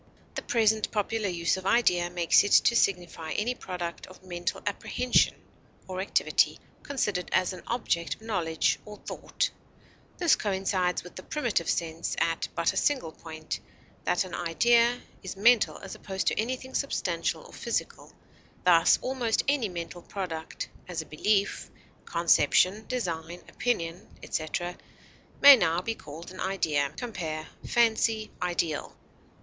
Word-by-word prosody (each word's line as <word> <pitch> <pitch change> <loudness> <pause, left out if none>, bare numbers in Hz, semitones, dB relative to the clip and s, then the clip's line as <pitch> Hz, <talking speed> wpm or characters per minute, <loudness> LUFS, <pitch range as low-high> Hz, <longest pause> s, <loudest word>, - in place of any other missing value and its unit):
The - - -3
present 220 -2 +2
popular 215 0 -1
use 170 +1 0
of 190 0 -5
idea 180 -7 +3
makes 175 -1 +4
it 205 - 0
to 235 - +6
signify 175 -6 0
any 235 +4 0
product 180 -6 -6
of 185 0 -15
mental 175 -1 -4
apprehension 240 +4 +2 0.5
or 185 0 -3
activity, 195 - +2 0.2
considered 210 -10 -2
as 185 0 +2
an 180 - -9
object 195 -8 -1
of - - -20
knowledge 170 -8 0
or 210 -1 -10
thought; - - -2 0.7
this 345 -3 +4
coincides 190 -2 0
with 180 - -12
the - - -6
primitive 235 - -1
sense 165 0 -1
at 165 -1 0
but 165 - +1
a - - -5
single 265 - +1
point 160 -1 -6 0.4
that 180 - +2
an 185 - -10
idea 235 +8 +3 0.2
is 185 - -6
mental 230 +2 +4
as 195 - -8
opposed 190 -1 -4
to - - +1
anything 255 +3 -3
substantial 280 - -1
or - - -15
physical; - - -3 0.5
thus, 170 -2 +6
almost 250 -4 0
any 275 -7 +2
mental 175 0 -6
product, 170 -4 -5 0.2
as 170 -3 -3
a - - -20
belief, 200 +7 0 0.4
conception, 175 +4 +3
design, 175 -8 -3
opinion, 175 -6 -2 0.2
etc., 175 +3 -3 0.7
may 280 0 +12
now 170 -7 +1
be 225 +5 -2
called 165 -2 -10
an 185 - -11
idea. 150 -7 0
Compare 165 -10 -4 0.2
FANCY; 225 -2 +2
IDEAL. 170 -4 -2
185 Hz, 140 wpm, -28 LUFS, 170-225 Hz, 0.7 s, may